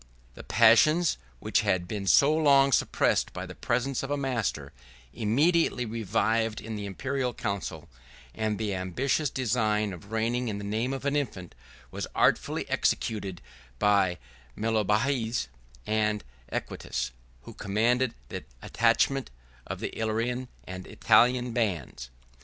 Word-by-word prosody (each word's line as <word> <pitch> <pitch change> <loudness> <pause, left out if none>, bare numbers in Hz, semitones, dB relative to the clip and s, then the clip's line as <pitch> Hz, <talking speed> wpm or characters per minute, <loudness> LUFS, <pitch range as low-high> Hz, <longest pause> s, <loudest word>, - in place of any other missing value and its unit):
The - - -10
passions, 155 - +5 0.2
which - - +1
had 90 -1 0
been 100 -1 -4
so 145 +7 +6
long 140 -3 +5
suppressed - - +2
by - - -5
the - - -9
presence 125 +2 -1
of 135 - -5
a 145 - 0
master, 115 - -2 0.4
immediately 135 +4 +2
revived 110 0 0
in 110 +1 -6
the 105 -1 -4
Imperial 125 +4 -2
council; 100 -3 -4 0.5
and 110 -1 -1
the 105 -2 -2
ambitious 125 - 0
design 110 -5 0
of 100 +4 -12
reigning 115 +2 0
in 105 -2 -2
the 100 - -6
name 110 +5 -1
of 135 +1 -5
an 140 0 +1
infant, 100 - -3 0.4
was - - -4
artfully - - +2
executed 100 -5 -1 0.3
by 100 0 +3 0.4
Mellobaudes 110 - 0 0.4
and 105 -1 0 0.3
Equitius, 65 0 -3 0.3
who - - -10
commanded 115 +5 +1
the - - -5 0.2
attachment 120 +4 +2 0.4
of - - -5
the - - -4
Illyrian 115 +3 -1 0.2
and 95 0 -7
Italian 125 0 +3
bands. 85 - -2
110 Hz, 130 wpm, -28 LUFS, 105-125 Hz, 0.5 s, so